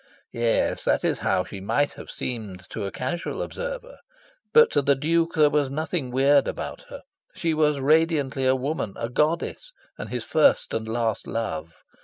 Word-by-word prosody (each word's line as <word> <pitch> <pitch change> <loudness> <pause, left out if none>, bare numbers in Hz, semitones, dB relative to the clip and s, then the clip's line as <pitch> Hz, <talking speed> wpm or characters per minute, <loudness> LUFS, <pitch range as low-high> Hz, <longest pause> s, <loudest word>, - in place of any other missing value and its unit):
Yes, 115 -1 +1
that - - +2
is - - 0
how 95 -1 +1
she 95 +1 -8
might 145 +9 +1
have - - -11
seemed 105 -7 -5
to 105 - -4
a 100 - -4
casual 130 +7 -4
observer. - - -6 0.5
But 465 0 +6
to - - +3
the 140 0 +3
Duke 165 +4 +1
there 150 -2 +5
was 145 -2 +1
nothing 155 -1 -2
weird 135 +3 +4
about - - -5
her: - - -9 0.3
she 165 -1 0
was 150 -2 +2
radiantly 145 -2 +2
a 130 - +4
woman; 130 -6 -3
a 115 - -3
goddess; 165 - -1 0.3
and - - -6
his 125 -2 -3
first 155 +7 +3
and 110 0 -2
last 115 -1 -1
love. 80 -8 -4
140 Hz, 175 wpm, -25 LUFS, 115-155 Hz, 0.5 s, But